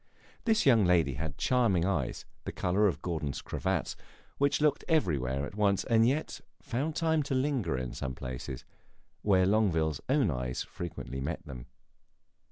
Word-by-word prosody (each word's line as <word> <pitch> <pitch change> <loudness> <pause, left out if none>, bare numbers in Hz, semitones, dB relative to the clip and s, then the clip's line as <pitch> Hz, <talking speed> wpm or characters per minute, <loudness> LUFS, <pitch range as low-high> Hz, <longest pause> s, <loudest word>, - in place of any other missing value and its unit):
This 225 -2 +3
young 120 -6 +6
lady 85 -6 +3
had 75 +2 -5
charming 115 -9 +2
eyes 100 0 -1 0.2
(of - - -39
the - - -3
color 95 +4 +2
of 95 - -2
Gordon's 80 -5 -3
cravats), - - -2 0.4
which 140 +1 +2
looked 150 -1 +2
everywhere 70 - +1
at - - -8
once 100 -2 +2
and 115 0 +4
yet 145 +5 -1 0.2
found 145 +6 -2
time 160 -1 +2
to 140 -1 -2
linger 130 - 0
in 65 -1 -4
some 65 -1 -4
places, 65 +1 -6 0.6
where 95 -3 +4
Longueville's 85 -8 +2
own 135 - +3
eyes 60 -1 -3
frequently 70 -6 -6
met 85 +5 -4
them. 65 -5 -9
95 Hz, 160 wpm, -30 LUFS, -, 0.6 s, young